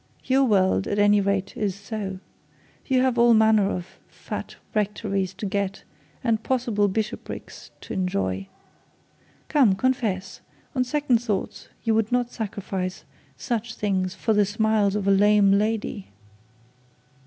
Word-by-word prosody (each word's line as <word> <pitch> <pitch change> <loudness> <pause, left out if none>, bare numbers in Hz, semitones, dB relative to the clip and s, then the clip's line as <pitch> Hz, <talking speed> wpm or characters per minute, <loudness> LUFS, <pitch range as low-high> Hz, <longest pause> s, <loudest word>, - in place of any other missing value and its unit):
Your 270 +1 +3
world, 190 -4 +2
at 205 - -1
any 205 0 +5
rate, 200 +2 -1
is 210 -6 -1
so. 200 -1 -5 0.7
You 260 -2 +3
have 255 -2 +1
all 235 -1 +6
manner 220 -2 +4
of 180 -3 -6
fat - - -7 0.2
rectories 200 -2 -1
to 200 - -5
get, 200 0 -2 0.4
and 225 -3 +1
possible 235 -6 +1
bishoprics 215 +4 -5
to - - -7
enjoy. 95 - -1 1.0
Come, 260 -11 +4
confess; 220 -5 -1 0.3
on 255 -3 +1
second 260 -2 +1
thoughts 210 -5 -3 0.2
you 225 - +2
would 220 0 +1
not 245 -1 +1
sacrifice 195 -4 -4 0.3
such 235 -2 -3
things 190 -2 -1
for 220 - 0
the 210 0 +4
smiles 210 -1 +1
of 200 -2 -2
a - - +5
lame 205 0 +5
lady?' 210 0 0
210 Hz, 135 wpm, -24 LUFS, 195-230 Hz, 1.0 s, all